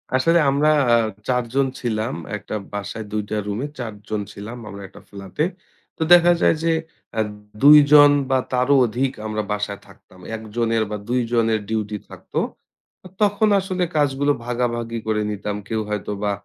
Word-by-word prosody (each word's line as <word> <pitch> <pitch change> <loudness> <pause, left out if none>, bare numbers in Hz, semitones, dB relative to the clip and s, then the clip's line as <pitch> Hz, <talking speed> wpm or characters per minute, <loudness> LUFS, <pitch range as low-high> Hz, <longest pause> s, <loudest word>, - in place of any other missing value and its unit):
আসলে 165 +6 +4
আমরা 145 +3 +2 0.2
আ - - +7 0.3
৪-জন 125 +2 +1
ছিলাম 110 -2 -2 0.2
একটা 110 - -7 0.2
বাসায় 105 +2 -5
২-টা 105 0 -3
রুমে 110 +8 -2
৪-জন 105 -2 -5
ছিলাম 110 +4 -8
আমরা 100 0 -9
একটা 95 - -15
ফ্লাট-এ। 100 - -3 0.5
তো - - -11
দেখা 175 0 +7
যায় - - +4
যে 165 - +2 0.5
আ - - +1 0.4
২-জন 145 0 +8 0.2
বা, 130 - +3 0.2
তারও 125 +3 +3
অধিক 125 +4 -1 0.2
আমরা 110 0 -2
বাসায় 105 -1 -3
থাকতাম। 95 - -19 0.2
১-জনের 115 +1 -1
বা, - - -2
১-জনের 115 -3 +1
ডিউটি 110 -1 -2
থাকত - - -15 0.9
তখন 210 +1 +3
আসলে 185 -1 -2
কাজগুলো 145 -1 +2
ভাগাভাগি 120 -1 -2
করে 105 -1 +1
নিতাম। 105 0 -4
কেউ 110 0 -1
হয়তো 105 -1 -3
বা 105 - +1
115 Hz, 145 wpm, -22 LUFS, 105-140 Hz, 0.9 s, ২-জন